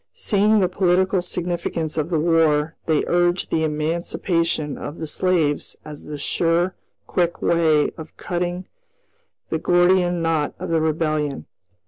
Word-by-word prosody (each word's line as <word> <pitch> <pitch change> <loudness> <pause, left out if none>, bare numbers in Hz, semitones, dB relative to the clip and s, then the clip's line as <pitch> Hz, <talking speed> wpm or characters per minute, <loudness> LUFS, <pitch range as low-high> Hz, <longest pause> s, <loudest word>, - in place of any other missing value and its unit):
Seeing 210 +1 +2
the 185 - +3
political 185 +1 +2
significance 170 -3 -3
of 155 0 -1
the 170 - +1
war, 160 -1 +2
they 155 -2 +2
urged 175 +1 +1
the 160 - +1
emancipation 160 0 -1
of 150 - -7
the 160 - -4
slaves 160 -3 0
as 150 -1 -9
the 150 -1 -5
sure, 170 +5 0 0.3
quick 175 -1 -1
way 160 -3 +2
of 160 0 -10
cutting 175 +1 -3 0.9
the 160 - 0
Gordian 175 0 +3
knot 160 -3 0
of - - -6
the 165 -1 +2
Rebellion. 155 -2 -1
165 Hz, 135 wpm, -22 LUFS, 155-175 Hz, 0.9 s, the